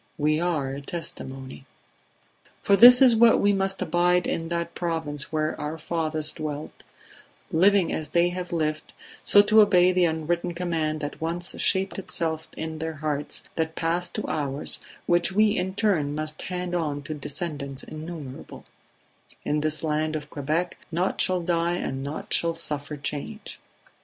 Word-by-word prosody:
We 155 Hz, 0 st, +2 dB
are 160 Hz, -6 st, -1 dB
a 140 Hz, -, -6 dB
testimony. 135 Hz, -4 st, -6 dB, 1.0 s
"For 200 Hz, -, +5 dB
this 245 Hz, +4 st, +10 dB
is 250 Hz, -3 st, +7 dB
it 225 Hz, -, +1 dB
that 235 Hz, -1 st, +6 dB
we 205 Hz, 0 st, +3 dB
must 195 Hz, 0 st, -1 dB
abide 175 Hz, +2 st, +2 dB
in 165 Hz, 0 st, -2 dB
that 170 Hz, 0 st, -3 dB
Province 160 Hz, -4 st, -3 dB
where 155 Hz, 0 st, 0 dB
our 150 Hz, +2 st, -4 dB
fathers 155 Hz, -1 st, -1 dB
dwelt, 150 Hz, -1 st, -6 dB, 0.7 s
living 190 Hz, +2 st, +4 dB
as 155 Hz, -2 st, -3 dB
they 170 Hz, +2 st, +3 dB
have 180 Hz, 0 st, -5 dB
lived, 155 Hz, -2 st, -2 dB, 0.3 s
so 205 Hz, -, +6 dB
to 215 Hz, +1 st, +6 dB
obey 185 Hz, -3 st, +5 dB
the 180 Hz, -1 st, +3 dB
unwritten 170 Hz, +2 st, -1 dB
command 160 Hz, -3 st, -1 dB
that 145 Hz, +1 st, -6 dB
once 170 Hz, +2 st, -1 dB
shaped 195 Hz, 0 st, +1 dB
itself 160 Hz, -4 st, -2 dB
in 160 Hz, 0 st, -5 dB
their 160 Hz, 0 st, -4 dB
hearts, 150 Hz, -1 st, -3 dB
that 160 Hz, 0 st, -2 dB
passed 170 Hz, +2 st, -1 dB
to -, -, -2 dB
ours, 145 Hz, -1 st, -2 dB, 0.3 s
which 175 Hz, +2 st, +2 dB
we 210 Hz, +1 st, +4 dB
in 190 Hz, +1 st, -2 dB
turn 165 Hz, -10 st, +1 dB
must 155 Hz, 0 st, -4 dB
hand 180 Hz, -1 st, -4 dB
on 150 Hz, -4 st, -2 dB
to 155 Hz, -, -5 dB
descendants 145 Hz, -2 st, -5 dB
innumerable: 155 Hz, -4 st, -8 dB, 0.8 s
In 150 Hz, -, 0 dB
this 155 Hz, +1 st, 0 dB
land 155 Hz, 0 st, 0 dB
of 150 Hz, -1 st, -6 dB
Quebec 155 Hz, +5 st, -2 dB
naught 175 Hz, +3 st, 0 dB
shall 185 Hz, -1 st, +1 dB
die 170 Hz, 0 st, 0 dB
and 135 Hz, -6 st, -3 dB
naught 145 Hz, +3 st, -5 dB
shall 170 Hz, -1 st, +1 dB
suffer 150 Hz, -2 st, -3 dB
change 150 Hz, +10 st, -5 dB
160 Hz, 160 wpm, -25 LUFS, 150-180 Hz, 1.0 s, this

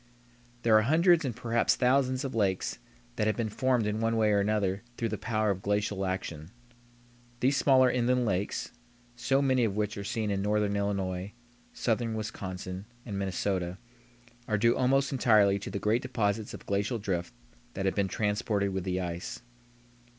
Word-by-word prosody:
There 115 Hz, -2 st, +5 dB
are 110 Hz, -, +7 dB
hundreds 165 Hz, -, +4 dB
and 125 Hz, -4 st, -2 dB
perhaps 115 Hz, -1 st, +1 dB
thousands 130 Hz, +1 st, +2 dB
of 135 Hz, -, -4 dB
lakes 100 Hz, -4 st, 0 dB, 0.4 s
that 105 Hz, -, +1 dB
have 110 Hz, -, 0 dB
been 115 Hz, -2 st, -1 dB
formed 125 Hz, +1 st, +1 dB
in 105 Hz, +1 st, -1 dB
one 115 Hz, 0 st, +1 dB
way 110 Hz, -1 st, +3 dB
or 100 Hz, -, +3 dB
another 100 Hz, -1 st, 0 dB, 0.2 s
through 115 Hz, -, -1 dB
the 110 Hz, -, -3 dB
power 110 Hz, -3 st, 0 dB
of 95 Hz, -1 st, -4 dB
glacial 100 Hz, -1 st, -1 dB
action. 85 Hz, -4 st, -4 dB, 0.9 s
These 135 Hz, +3 st, +2 dB
smaller 130 Hz, -2 st, +5 dB
inland 125 Hz, 0 st, +2 dB
lakes, 100 Hz, -1 st, -2 dB, 0.4 s
so 135 Hz, +3 st, +1 dB
many 130 Hz, -2 st, +3 dB
of 105 Hz, -4 st, 0 dB
which 105 Hz, 0 st, -1 dB
are -, -, -4 dB
seen 110 Hz, -1 st, -2 dB
in 100 Hz, -1 st, -1 dB
northern 105 Hz, 0 st, +1 dB
Illinois, 100 Hz, -1 st, -2 dB, 0.4 s
southern 115 Hz, -1 st, -1 dB
Wisconsin, 95 Hz, -3 st, -5 dB, 0.2 s
and 100 Hz, -4 st, -4 dB
Minnesota, 95 Hz, -1 st, -2 dB, 0.7 s
are 105 Hz, -, +1 dB
due 115 Hz, +3 st, +3 dB
almost 135 Hz, +1 st, +2 dB
entirely 105 Hz, -6 st, +4 dB
to 100 Hz, -, -6 dB
the -, -, -3 dB
great 110 Hz, +4 st, +1 dB
deposits 110 Hz, -4 st, -1 dB
of -, -, -12 dB
glacial 100 Hz, +4 st, 0 dB
drift 90 Hz, -4 st, -3 dB, 0.4 s
that 95 Hz, -, -2 dB
have 95 Hz, -, +2 dB
been 100 Hz, -1 st, +1 dB
transported 105 Hz, -1 st, -1 dB
with 95 Hz, -1 st, -3 dB
the 90 Hz, 0 st, -1 dB
ice. 90 Hz, +5 st, -5 dB
105 Hz, 170 wpm, -29 LUFS, 100-120 Hz, 0.9 s, are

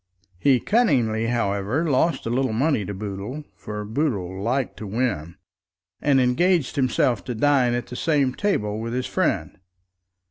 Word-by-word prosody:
He 135 Hz, +1 st, +4 dB
cunningly, 120 Hz, -, +2 dB
however, 115 Hz, +5 st, 0 dB
lost 155 Hz, +4 st, +1 dB
a 115 Hz, -, -2 dB
little 130 Hz, -1 st, +1 dB
money 130 Hz, -2 st, +1 dB
to 100 Hz, -, -5 dB
Boodle, 105 Hz, +8 st, -5 dB
for 105 Hz, 0 st, -6 dB
Boodle 105 Hz, -, -2 dB
liked 125 Hz, +4 st, -1 dB
to 110 Hz, -, -6 dB
win, 100 Hz, -7 st, -2 dB, 0.7 s
and 140 Hz, -2 st, +3 dB
engaged 140 Hz, +5 st, +2 dB
himself 125 Hz, -4 st, +1 dB
to 125 Hz, -, -4 dB
dine 130 Hz, -1 st, +3 dB
at 120 Hz, -1 st, -2 dB
the 125 Hz, -, -9 dB
same 140 Hz, -3 st, +1 dB
table 110 Hz, -, -1 dB
with 115 Hz, +1 st, -4 dB
his 125 Hz, 0 st, -1 dB
friend. -, -, -1 dB
125 Hz, 150 wpm, -23 LUFS, 105-140 Hz, 0.7 s, He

